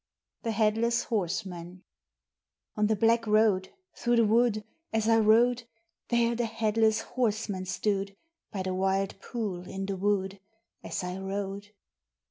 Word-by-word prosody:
THE 230 - -3
HEADLESS 225 +2 +2
HORSEMAN 180 -3 -3 0.9
On 210 0 +2
the 220 - +2
black 230 +2 +2
road 210 -3 +3 0.3
through 240 -1 +1
the 230 -1 +5
wood 220 0 +3 0.3
As 220 -1 0
I 225 0 +5
rode, 230 +3 +4 0.4
There 235 -1 +2
the 235 0 0
Headless 220 -1 +1
Horseman 215 -6 -2
stood; 195 +1 -1 0.4
By 195 -3 -3
the 185 0 -2
wild 195 +1 0
pool 195 -7 -4
in 195 0 -4
the 195 0 -2
wood, 195 0 0 0.4
As - - -4
I 180 +1 -4
rode. 195 +1 -4
210 Hz, 135 wpm, -29 LUFS, 195-225 Hz, 0.9 s, the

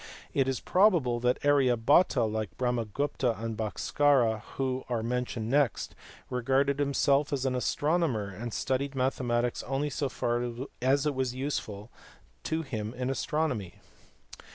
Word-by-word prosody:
It 135 -1 +2
is 135 -2 -1
probable 175 - +3
that 125 +1 +2
Arya 135 -4 +4
Bhata, 140 +3 +4
like 110 -2 -3
Brahmagupta 125 0 -1
and 115 0 -3
Bhaskara 115 +1 +2
who 130 -1 -1
are 115 -2 -1
mentioned 120 -2 -2
next, 140 -4 +1 0.3
regarded 135 +3 +1
himself 140 0 +2
as 135 -2 -1
an 130 - +1
astronomer, 135 - 0
and 115 +5 -6
studied 135 +4 -1
mathematics 125 -2 0
only 135 +3 -2
so 140 0 -1
far 120 -1 -1 0.4
as 135 +3 +2
it 150 - +1
was 130 -2 -2
useful 120 -6 -4 0.5
to 160 +1 -1
him 110 -4 -5
in 125 +1 -2
his 135 - -2
astronomy. 135 - -1
130 Hz, 140 wpm, -29 LUFS, 120-140 Hz, 0.5 s, Arya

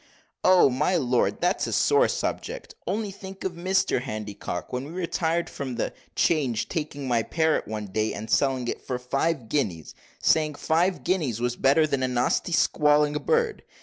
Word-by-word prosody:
"Oh! 185 -3 +6
my 150 +8 +1
lord, 125 -6 +1
that's - - +1
a - - -3
sore - - +4
subject; - - -4
only 205 +2 -1
think 190 0 -10
of 190 - -1
Mr 185 -5 +1
Handycock, 105 -6 -5
when 125 +2 -2
we 150 - -9
retired 170 -1 -1
from 130 -3 -5
the 115 - -2 0.2
'Change, 130 -9 +1
taking 150 -4 -4
my 120 -2 +2
parrot 160 +6 0
one 105 -1 -4
day 110 +3 -1
and 105 +2 -6
selling 130 +1 +1
it - - -3
for 125 - -3
five 135 +1 -1
guineas, 100 - -2 0.3
saying, 155 -2 +2
five 170 +5 +1
guineas 150 - 0
was 120 0 -1
better 140 +5 +4
than 140 -3 -1
a 130 - +1
nasty 125 +7 0
squalling, 150 -2 +3
bird. 470 - 0
145 Hz, 170 wpm, -26 LUFS, 120-170 Hz, 0.3 s, Oh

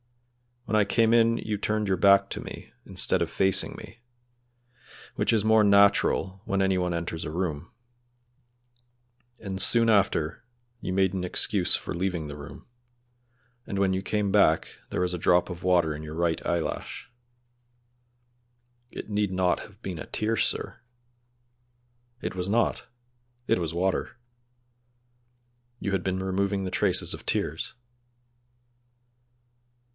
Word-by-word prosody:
"When 110 - -1
I 105 - +5
came 115 +3 +2
in 115 0 +4
you 105 -2 -3
turned 105 0 -1
your 95 -1 +1
back 100 +1 +5
to - - -4
me, - - -9
instead - - +1
of - - 0
facing 95 -1 +2
me, 115 - -12 1.2
which - - +1
is 110 -3 +2
more 110 0 +5
natural 100 -1 +3
when 100 0 0
any 95 -1 +2
one 90 -1 -1
enters 85 -1 -4
a - - -4
room; 85 -1 -3 1.7
and 95 -2 -5
soon 115 -1 +5
after 100 -2 +1 0.4
you 95 - -4
made 95 -1 +2
an 95 -1 -2
excuse 90 +1 +1
for - - -5
leaving 85 -3 -2
the 75 0 -8
room, 70 - -11 1.0
and 100 - -4
when 95 -1 +2
you 95 - -1
came 105 0 -1
back 95 -6 +3 0.2
there - - -2
was 90 0 0
a - - -2
drop 90 +2 +3
of 90 0 -7
water 90 -4 +2
in 75 - -7
your 80 0 -7
right 85 -1 0
eyelash." 85 +8 -3 1.8
"It - - -8
need 105 -2 0
not 95 -1 +1
have 105 +2 -14
been 90 -4 -5
a - - -7
tear, 110 +1 -1
sir!" - - -1 1.4
"It - - -4
was 90 +1 -3
not; 115 +2 +1 0.6
it - - +1
was 85 -2 -3
water. 95 +6 -1 1.6
You 100 - -3
had 95 -2 -1
been 95 0 -2
removing 100 +1 -1
the 95 - -4
traces - - +2
of - - -9
tears." - - -2
95 Hz, 145 wpm, -27 LUFS, 90-105 Hz, 1.8 s, I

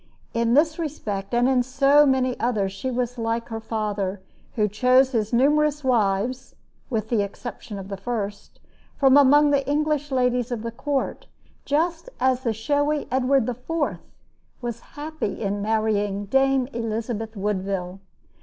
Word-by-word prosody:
In 230 0 +2
this 315 +3 +3
respect, 210 -11 -4
as 240 0 +2
in 260 -1 +3
so 275 +3 +4
many 260 -1 +2
others, 215 -5 0
she 195 +7 -4
was 245 -1 -2
like 230 +1 -2
her 225 -1 -4
father, 210 -3 -3 0.4
who 210 -3 +2
chose 255 +5 +3
his 220 -4 -1
numerous 295 +4 +2
wives, 235 0 0 0.3
with 220 -4 -2
the 230 -4 +2
exception 205 +1 -6
of 195 -1 -7
the 195 0 -5
first, 205 -1 -5 0.4
from 270 -1 +5
among 290 +1 +6
the 280 -1 +2
English 300 0 0
ladies 250 -1 +1
of 235 -3 -4
the 230 - -3
court; 275 +3 -3 0.4
just 330 +7 0
as 255 0 +2
the 240 -3 0
showy 290 +7 0
Edward 260 -1 +2
IV. 255 +6 -2 0.6
was 240 -3 -4 0.2
happy 310 -6 -4
in 200 -1 -2
marrying 205 -2 0
"Dame 270 +3 +2
Elizabeth 225 -1 -3
Woodville." 195 -2 -2
245 Hz, 145 wpm, -24 LUFS, 215-275 Hz, 0.6 s, among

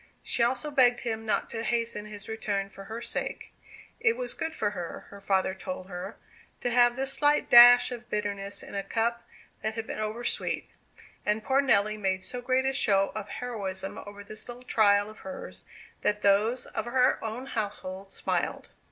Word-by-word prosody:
She - - 0
also 260 +5 +1
begged 245 -4 +4
him 225 -2 -3
not - - +1
to 225 - -3
hasten 230 -2 -1
his 210 -1 -8
return 205 -3 -2
for 195 0 -11
her 225 +3 -6
sake. - - -4 0.5
It 450 0 +3
was - - -2
good 320 0 -4
for 205 -1 0
her, 175 -4 -6
her 200 0 -11
father 190 -1 +1
told 190 -1 -6
her, 180 -1 -6 0.5
to 245 - 0
have 240 0 +5
this 270 +1 -1
slight 295 +1 +2
dash 245 +1 +9
of 240 -1 -7
bitterness 200 -1 -3
in - - -10
a 200 - -1
cup 235 +3 -1 0.4
that 220 0 -2
had 225 -1 -3
been - - -5
over 215 +2 -3
sweet. - - -1 0.6
And 210 +1 0
poor 270 +1 +3
Nelly 215 -5 +2
made 190 -2 0
so 250 +4 -5
great 255 +1 +1
a 270 - +1
show 195 -7 +2
of 215 -1 -6
heroism 195 -6 -4
over 205 0 -9
this 215 +2 -6
little 245 +1 -9
trial 205 -4 +4
of 215 0 -12
hers, 280 -1 -8 0.4
that 210 0 0
those 210 +5 +3
of 220 - -4
her 255 +1 +2
own 225 +4 -4
household 200 -5 -4
smiled. - - -2
220 Hz, 185 wpm, -28 LUFS, 200-245 Hz, 0.6 s, dash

